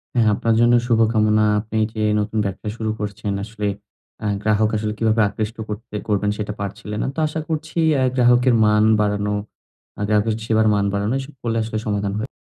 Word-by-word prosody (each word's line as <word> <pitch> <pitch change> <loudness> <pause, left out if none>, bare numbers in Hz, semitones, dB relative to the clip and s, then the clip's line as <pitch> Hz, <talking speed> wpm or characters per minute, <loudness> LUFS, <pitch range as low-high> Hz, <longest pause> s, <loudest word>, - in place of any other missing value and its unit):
হ্যাঁ, 115 -3 +4
আপনার 115 +1 +1
জন্য 120 0 +5
শুভকামনা। 110 -2 +3
আপনি 110 +1 -4 0.2
যে 110 - -3 0.2
নতুন 105 +1 -2
ব্যবসা 100 +2 -4
শুরু 110 -1 -2
করছেন 105 -1 -3
আসলে 105 0 -4 0.6
আ - - -3 0.2
গ্রাহক 110 0 +2
আসলে 105 0 -2
কিভাবে 110 0 +2
আকৃষ্ট 110 +2 -4
করতে 105 +1 -7
করবেন 105 -1 +1
সেটা 105 0 -3
পারছিলেন 105 +1 -5
না। - - -1
তো - - -4
আশা 150 +1 -4
করছি 160 +1 -4 0.2
আ - - +3
গ্রাহকের 125 0 +4
মান 105 0 +4 0.2
বাড়ানো, 105 0 0 0.7
আ - - -4
গ্রাহকের 105 +1 +2
সেবার 110 -1 +2
মান 100 -1 +1
বাড়ানো, 100 +3 0
এসব 135 +2 -8
করলে 115 -1 -1
আসলে 110 0 -4
সমাধান 100 -1 -1
হয়। 110 +4 -3
110 Hz, 185 wpm, -21 LUFS, 105-115 Hz, 0.7 s, জন্য